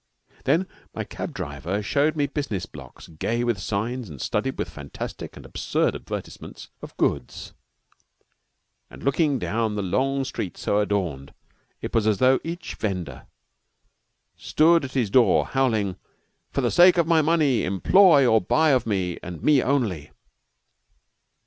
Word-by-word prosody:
Then 165 +8 +2 0.3
my - - -3
cab - - -6
driver 80 +9 -4
showed 145 +9 +1
me 145 -2 +1
business 140 - -3
blocks - - -13
gay 115 +9 -2
with 120 -5 0
signs 110 +4 -3
and 70 -4 -10
studded - - -2
with - - -2
fantastic 70 -1 -8
and - - -12
absurd - - -1
advertisements - - -8
of - - -11
goods, 70 -4 -2 1.4
and - - -13
looking 140 0 +2
down 110 -2 -1
the 105 - -2
long 135 +8 0
street 105 -8 -5
so 100 - 0
adorned, 90 -10 -2 0.5
it - - -5
was 110 -2 +2
as 105 -2 +2
though 130 +4 +4
each 170 0 -6
vender 90 -8 -5 1.1
stood 165 -1 +3
at 130 - -9
his 120 -7 0
door 120 -5 +4
howling: 110 -8 0 0.5
"For - - -2
the - - 0
sake 175 +1 +6
of 170 - +3
my 165 -1 +4
money, 155 -5 +2
employ 145 - +5
or 110 -3 +4
buy 155 - +2
of 125 -4 +1
me, 95 -5 -1
and 85 -3 -8
me 145 -3 +4
only!" 110 - -1
120 Hz, 150 wpm, -24 LUFS, 95-145 Hz, 1.4 s, sake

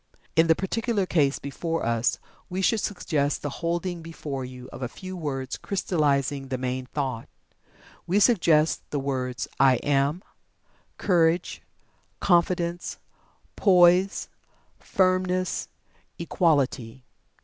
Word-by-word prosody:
In 160 +1 +5
the 160 - +5
particular 210 +2 -1
case 145 -6 +2
before 165 +3 -3
us, 115 0 +1 0.3
we 190 +1 -2
should 225 +3 +3
suggest 155 -7 -1
the 145 -2 -5
holding 170 +1 -2
before 150 -5 -6
you 125 0 -9
of - - -9
a 125 - -1
few 185 +9 -8
words 135 -6 -4
crystallizing 145 -7 0
the 130 -1 -2
main 130 0 -3
thought. 130 -5 -3 0.8
We 190 +4 +3
suggest 170 -9 +4
the 150 - -2
words 130 -2 -3
"I 135 -1 +6
Am"; 145 +5 +1 0.7
Courage; 170 -2 +1 0.6
Confidence; 175 -1 +1 0.6
Poise; 180 0 +4 0.5
Firmness; 185 -1 0 0.5
Equality. 140 -8 0
160 Hz, 110 wpm, -26 LUFS, 135-180 Hz, 0.8 s, I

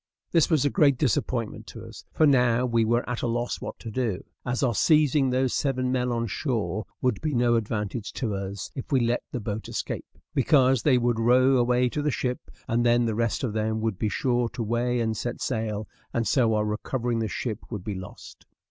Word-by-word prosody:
This 165 -3 +3
was 155 -5 +3
a 145 - +2
great 145 -8 +4
disappointment 120 -3 -1
to - - -9
us, - - -11
for 155 - +3
now 125 -3 +4
we 115 -2 +2
were 120 +2 +1
at 125 -1 -3
a - - 0
loss 120 +1 -2
what - - -6
to 115 - -8
do, 110 -5 -2 0.2
as 125 +2 -1
our 125 -3 +2
seizing 150 +1 +3
those 130 0 +1
seven 130 -3 0
men 125 -1 0
on 115 -1 -1
shore 110 - -2 0.2
would 125 -5 +1
be 155 -3 -1
no 120 0 +3
advantage 110 -1 -2
to 115 -6 -2
us 95 -1 -5
if 135 +4 -7
we 135 - +4
let 120 0 +1
the 125 - -3
boat 105 0 -5
escape; - - -4 0.3
because 135 -2 +4
they 135 -4 +4
would 120 -1 +1
row 130 +3 +4
away 125 0 +3
to 150 - -2
the 150 - +1
ship, 125 -2 -3 0.2
and 115 +1 +1
then 120 0 +3
the 115 - 0
rest 115 +3 -1
of 120 -5 -1
them 110 0 -1
would 110 -4 -2
be 110 - 0
sure 120 +2 0
to 125 -1 -4
weigh 120 +2 0
and 110 -1 0
set 120 +3 -4
sail, 110 -3 -2 0.3
and 115 -1 +1
so 115 -5 +3
our 105 0 +1
recovering 115 +2 -2
the 110 - 0
ship 110 +1 -3
would 105 -6 -5
be 105 - -3
lost. 95 -1 -10
120 Hz, 220 wpm, -26 LUFS, 110-130 Hz, 0.3 s, great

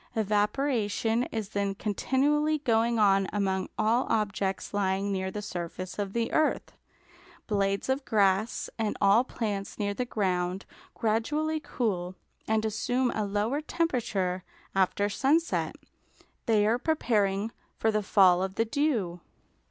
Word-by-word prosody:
Evaporation 220 +2 +1
is 220 -3 -4
then 200 -2 -1
continually 290 +9 +1
going 235 -4 +1
on 195 -2 +4
among 190 -2 -1
all 225 +4 +2
objects 200 -3 -1
lying 200 0 0
near 190 -1 -1
the 210 +2 -5
surface 185 +1 -6
of 200 -1 -2
the 235 -1 -1
earth. 310 - +1 0.7
Blades 200 -2 0
of 265 +1 0
grass 205 -2 +1
and 220 -2 -1
all 200 +4 +5
plants 205 -6 -4
near 205 -1 -1
the 250 - -2
ground 185 -4 -1 0.3
gradually 295 +8 0
cool 185 -11 -2 0.3
and 220 0 +1
assume 245 +4 0
a 215 - -1
lower 210 +8 -1
temperature 230 - -1 0.3
after 195 +1 +2
sunset; 285 +10 +1 0.7
they 215 -2 +4
are 230 +3 +2
preparing 215 -8 +1 0.3
for 220 - +2
the 215 0 +1
fall 190 -3 +5
of 190 0 -3
the 225 - +1
dew. 230 - 0
210 Hz, 130 wpm, -28 LUFS, 195-240 Hz, 0.7 s, all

